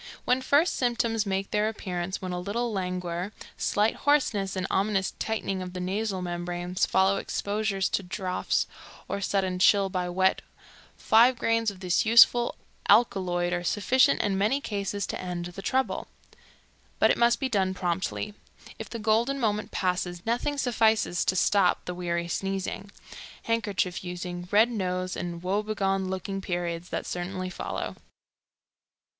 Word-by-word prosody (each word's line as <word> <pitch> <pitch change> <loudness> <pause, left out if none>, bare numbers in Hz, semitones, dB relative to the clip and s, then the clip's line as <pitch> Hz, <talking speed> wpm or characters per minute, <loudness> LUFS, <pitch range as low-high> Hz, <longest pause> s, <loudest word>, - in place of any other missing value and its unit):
When 250 +1 +2
first 290 +6 +3
symptoms 230 -3 0
make 195 0 -2
their 210 +1 +2
appearance, 185 -3 -4
when 185 - -3
a 180 - -2
little 225 +5 -2
languor, 180 -1 -3 0.2
slight 210 +2 +1
hoarseness 230 -10 +1
and 185 0 -2
ominous 195 0 +1
tightening 195 -4 -2
of 180 -1 -6
the 185 - -5
nasal 190 +1 -2
membranes 175 +1 -2
follow 190 +1 +3
exposure 200 0 -2
to 190 - +1
draughts 185 0 -1 0.4
or 200 - -3
sudden 190 -2 0
chill 195 +1 +5
by 180 -2 -2
wet, 190 +1 +2 0.6
five 235 +3 +5
grains 230 -1 +1
of 190 -2 -10
this 180 -2 +2
useful 235 +1 +6 0.3
alkaloid 180 -6 +3
are 175 0 -1
sufficient 250 - +3
in 195 -2 0
many 220 +8 +2
cases 200 -5 -3
to - - -5
end 180 -1 -4
the 175 +2 -7
trouble. 260 +7 -1 0.9
But - - +5
it - - +1
must 235 0 +4
be 265 - 0
done 190 -6 0
promptly. 185 +4 -2 0.5
If - - -6
the 235 - -5
golden 230 +5 +1
moment 210 -3 0
passes, 180 -1 -2
nothing 245 +5 0
suffices 220 -8 +2
to 185 - +1
stop 190 +1 +3
the 180 - -4
weary 170 -1 -2
sneezing, 195 +2 -3 0.5
handkerchief 205 -6 -1
using, 180 0 -5
red 220 +4 +4
nose 185 -4 -2
and 170 0 -5
woe 195 +3 +1
begone 195 -3 -1
looking 195 +1 -4
periods 175 -1 -3
that - - -3
certainly 185 +1 -4
follow. - - -5
195 Hz, 150 wpm, -27 LUFS, 180-220 Hz, 0.9 s, useful